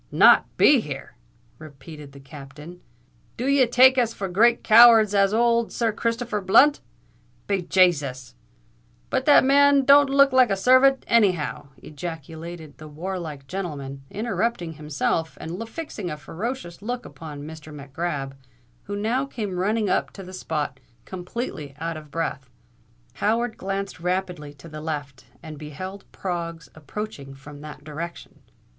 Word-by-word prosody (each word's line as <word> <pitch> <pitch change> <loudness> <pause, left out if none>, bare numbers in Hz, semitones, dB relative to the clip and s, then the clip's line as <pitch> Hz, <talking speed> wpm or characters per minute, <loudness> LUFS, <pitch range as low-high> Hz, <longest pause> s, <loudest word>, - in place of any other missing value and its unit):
"Not - - +6
be 285 -3 +6
here!" 145 -10 -7 0.5
repeated 150 0 -12
the 140 - -13
Captain. 145 +5 -12 0.6
"Do 245 - -3
ye 275 -1 +4
take 255 +2 +6
us 230 -2 0
for 200 - -4
as 180 - -6
great 235 +4 +4
cowards 225 -2 +7
as 195 -1 +3
ould 235 +1 +2
Sir 230 -2 0
Christopher 230 0 -2
Blunt? 275 +10 +5 0.7
Be 200 -2 0
Jasus——But 130 - -2
that 295 - +7
man 280 0 +4
don't 280 0 +6
look 275 0 +5
like 255 -3 +5
a 195 - +1
servant 260 +6 +4
anyhow!" 185 -11 +1
ejaculated 160 0 -8
the 155 - -10
warlike 155 -2 -6
gentleman, 140 -6 -6
interrupting 210 -4 -2
himself, 155 +1 -2
and 180 +8 -6
fixing 230 - -6
a 150 - -5
ferocious 175 - -6
look 245 +3 -4
upon 150 -3 -9
Mr. 155 0 -10
Mac 140 -2 -11
Grab, 145 -5 -3 0.5
who 205 - -5
now 235 +7 -1
came 205 -8 -5
running 210 +3 0
up - - 0
to 195 - -9
the 185 0 -11
spot, 150 -7 -4 0.3
completely 180 - -6
out 165 +1 -4
of 155 -1 -10
breath. 140 -4 -4 0.7
Howard 230 +2 0
glanced 195 0 -4
rapidly 180 -4 -3
to 140 +4 -14
the 155 -1 -9
left, 145 -4 -6 0.2
and 155 -2 -9
beheld 185 +7 -8
Proggs 170 -3 -5
approaching 150 -3 -7
from 145 +1 -12
that 150 -1 -10
direction. 160 +3 -8
180 Hz, 145 wpm, -24 LUFS, 150-225 Hz, 0.7 s, cowards